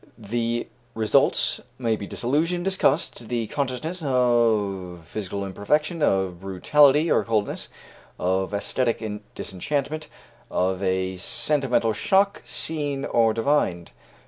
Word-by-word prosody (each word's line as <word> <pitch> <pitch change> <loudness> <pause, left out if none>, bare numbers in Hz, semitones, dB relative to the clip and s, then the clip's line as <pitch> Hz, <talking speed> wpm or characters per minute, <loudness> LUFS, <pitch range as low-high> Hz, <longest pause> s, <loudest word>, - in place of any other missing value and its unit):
The 115 +2 -2 0.3
results 110 -1 +2 0.2
may 115 -3 0
be 100 -2 -7
disillusion, 165 +8 0
disgust, 190 - 0
the 120 -2 -1
consciousness 140 - -3
of 110 - +1
physical 100 +2 -4
imperfection, 150 - 0
of 95 -8 +1
brutality 145 - +4
or - - +3
coldness, 110 -3 -1 0.5
of 95 +1 0
æsthetic 110 0 -1 0.2
disenchantment, 145 - -3 0.4
of 95 +1 0
a 95 -1 0
sentimental 125 +2 +1
shock, 195 - +2
seen 145 -3 -2
or 115 -1 +3
divined. 110 - 0
115 Hz, 105 wpm, -24 LUFS, 100-145 Hz, 0.5 s, brutality